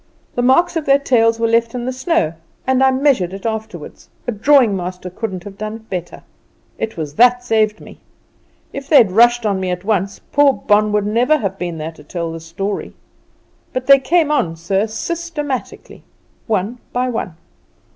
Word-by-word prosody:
The 245 - -1
marks 340 +8 +3
of 315 -3 -2
their 275 0 +6
tails 230 -4 +2
were 230 - +2
left 230 +1 +1
in 240 -1 -3
the 255 - -2
snow, 255 - 0 0.3
and 260 0 +2
I 265 - +6
measured 260 -9 +1
it 195 +2 -8
afterward; 220 -7 -5 0.2
a 245 - -1
drawing 240 0 +4
master 180 0 -5
couldn't 185 -2 -5
have 200 -1 -11
done 215 +1 -4
it 225 0 -14
better. 175 -2 -5 0.6
It 220 - -4
was 150 -3 -4
that 245 +1 +5
saved 215 -3 +1
me. - - -14 0.7
If 275 +1 -7
they'd 235 - +6
rushed 240 +3 +4
on 200 -2 0
me 185 -1 -2
at 180 +1 -4
once, 200 -2 0
poor 290 0 +4
old 275 - 0
Bon 210 0 +3
would 210 -1 +1
never 245 +8 +2
have 195 -7 -4
been 175 -2 -4
here 155 +1 -4
to 155 -2 -16
tell 170 +2 -4
this 165 0 -9
story. 195 +5 -4 0.8
But 255 0 -3
they 275 +1 +7
came 305 +3 +2
on, 170 - 0
sir, 190 +6 -1
systematically, 295 +2 -5 0.5
one 220 +2 -1
by 250 +1 0
one. 225 -8 -4
225 Hz, 185 wpm, -18 LUFS, 190-260 Hz, 0.8 s, they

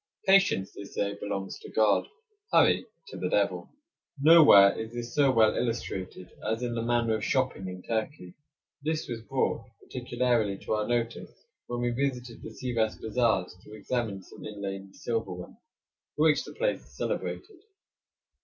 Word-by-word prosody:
Patience, 190 - +4
they 100 - -8
say, 100 0 -2
belongs 100 -1 -4
to - - -11
God; 110 -2 +3 0.4
hurry, - - +4 0.2
to - - -8
the - - -2
devil. - - 0 0.5
Nowhere 145 -11 +8
is 110 0 -5
this 120 0 -6
so 145 -2 +4
well 110 -3 +4
illustrated 95 -6 -3
as 110 +3 -1
in 120 -1 -2
the 115 - -2
manner 115 -1 +1
of 110 - -4
shopping 130 -6 0
in 90 0 -7
Turkey. 110 -5 -3 0.5
This 155 +2 -2
was 115 -2 -5
brought 130 +1 -1
particularly 120 -5 -1
to - - -1
our 105 0 0
notice 120 -1 -1 0.4
when 120 0 -3
we 120 0 +1
visited 125 -2 -3
the - - -7
Sivas 115 -4 -1
bazaars 110 -5 0
to 105 - -13
examine 110 -4 -3
some - - -13
inlaid 100 -2 -6
silverware, 100 -7 -4 0.6
for 150 - +1
which 150 -2 +3
the - - -10
place - - -1
is - - -20
celebrated. 410 -5 -4
115 Hz, 155 wpm, -28 LUFS, 105-125 Hz, 0.6 s, Nowhere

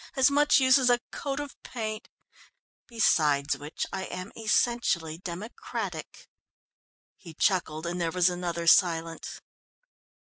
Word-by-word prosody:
As 265 0 +4
much 295 +1 +4
use 260 +1 +5
as 255 -1 +3
a 245 - +5
coat 275 0 -4
of 290 -1 -6
paint! 215 -3 -6 0.8
Beside 150 - +2
which, 150 +2 -5
I 190 -1 -3
am 185 +4 -7
essentially 215 -8 0
democratic." 185 +5 -6 0.9
He 165 -5 -13
chuckled, 160 -4 0
and 175 +1 -3
there 165 - 0
was 180 +1 +2
another 175 -2 -2
silence. 165 -1 +2
185 Hz, 120 wpm, -27 LUFS, 165-240 Hz, 0.9 s, use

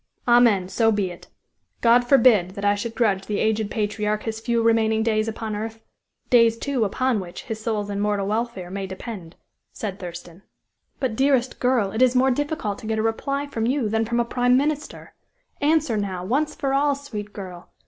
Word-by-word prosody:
"Amen; 235 -6 +5
so 225 +3 +2
be 200 -4 -1
it; 175 - -12 0.5
God 240 +1 +5
forbid 230 -8 +4
that 200 -1 -4
I 205 - +4
should 225 +3 -4
grudge 200 -5 +1
the 210 - -1
aged 220 -1 0
patriarch 210 0 -1
his 220 -1 -4
few 230 0 0
remaining 220 -1 +2
days 215 -1 +1
upon 220 -1 -4
earth 225 +1 -6 0.5
days, 230 -2 +5
too, 265 -1 -1
upon 250 +3 0
which 175 -2 -8
his 220 -1 -5
soul's 215 -2 -2
immortal 205 0 0
welfare 210 -4 -3
may 195 0 -4
depend," 190 -3 -8 0.4
said 205 -2 -5
Thurston. 175 -1 -9 0.6
"But, 255 -5 -1
dearest 265 -1 +1
girl, 245 -6 +1
it 220 - -2
is 255 0 +4
more 260 +1 +4
difficult 260 -6 -2
to 225 - -9
get 220 0 -1
a 220 - 0
reply 275 +5 -1
from 230 -5 -2
you 255 -4 0
than 225 +1 +1
from 235 +2 -1
a 240 - +2
prime 245 +1 +2
minister. 295 +2 -3 0.5
Answer, 295 -6 +2
now, 190 -3 -3
once 295 +8 0
for 275 -5 -1
all, 285 +1 +2
sweet 215 -8 -7
girl! 185 -4 -9
225 Hz, 190 wpm, -23 LUFS, 205-245 Hz, 0.6 s, Amen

